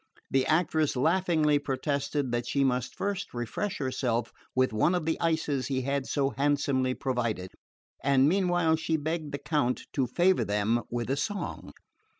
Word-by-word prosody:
The 135 -1 +2
actress 155 -2 +2
laughingly 155 0 +2
protested 140 0 -1
that 120 0 -1
she 140 - +1
must 125 -2 0
first 200 -8 -3
refresh 150 - -3
herself 125 -3 -1 0.2
with 130 -2 +2
one 155 +12 +3
of 175 -3 -1
the 160 - +1
ices 160 -5 0
he 130 -2 -1
had 140 0 -1
so 140 -1 0
handsomely 140 -2 +1
provided; 120 -8 -2 0.5
and 135 0 +4
meanwhile 175 -2 +3
she 160 0 0
begged 155 0 -3
the 140 - -2
Count 145 -5 0
to 135 -4 +1
favour 180 +9 +3
them 105 +3 +1
with 120 +1 -2
a 135 - 0
song. 205 +5 -4
140 Hz, 155 wpm, -28 LUFS, 130-160 Hz, 0.5 s, and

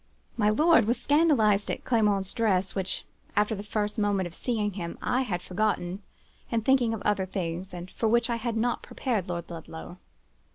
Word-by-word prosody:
"My 210 -2 +3
lord 315 +5 +5
was 235 +3 +1
scandalized 265 -10 +3
at - - -3
Clement's 205 -5 +2
dress, 195 -5 +1
which, 190 -1 -2 0.3
after 210 +1 +2
the 200 - -4
first 210 0 -2
moment 205 -2 +1
of 175 - -7
seeing 210 -1 -1
him 170 -3 -5
I 250 +1 +1
had 180 -9 -2
forgotten, 190 -1 -1 0.5
in 230 -1 +1
thinking 240 -1 +3
of 205 - -8
other 195 -2 +1
things, 185 0 -4
and 175 +1 -8
for 225 - -1
which 235 +1 +3
I 235 -1 -1
had 230 0 -2
not 240 +2 0
prepared 220 -9 -2
Lord 170 -1 -3
Ludlow. 165 +2 -8
210 Hz, 180 wpm, -28 LUFS, 185-230 Hz, 0.5 s, lord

